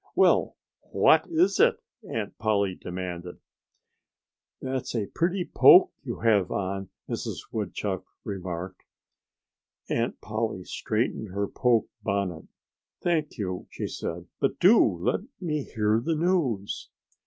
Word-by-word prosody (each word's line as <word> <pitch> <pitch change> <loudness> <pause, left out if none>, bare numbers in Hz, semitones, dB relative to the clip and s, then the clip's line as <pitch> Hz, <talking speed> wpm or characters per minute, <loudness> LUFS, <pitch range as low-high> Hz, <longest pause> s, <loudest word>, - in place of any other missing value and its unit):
"Well, - - +3 0.3
what - - +5
is 340 +3 +2
it?" 470 -1 +5 0.3
Aunt 110 -2 -3
Polly 100 -3 +1
demanded. 90 -1 -6 1.2
"That's 130 -1 -3
a 110 -3 0
pretty 175 - -1
poke 180 - +7
that 140 - -23
you 120 - -4
have 105 -5 +3
on," 95 0 -3 0.2
Mrs. - - -4
Woodchuck 100 -2 -3 0.2
remarked. 90 -2 -5 1.1
Aunt - - -1
Polly 110 -4 -3
straightened 110 +3 -2
her 100 +2 -2
poke 120 -1 +2
bonnet. 95 -5 -2 0.6
"Thank 160 -5 0
you!" 90 -4 -4
she - - -5
said. 85 +1 -5
"But 135 - 0
do 210 +6 +7
let 90 -4 0 0.2
me 155 -5 -1
hear 110 0 +1
the 165 +3 0
news." 150 - 0
105 Hz, 120 wpm, -27 LUFS, 95-145 Hz, 1.2 s, poke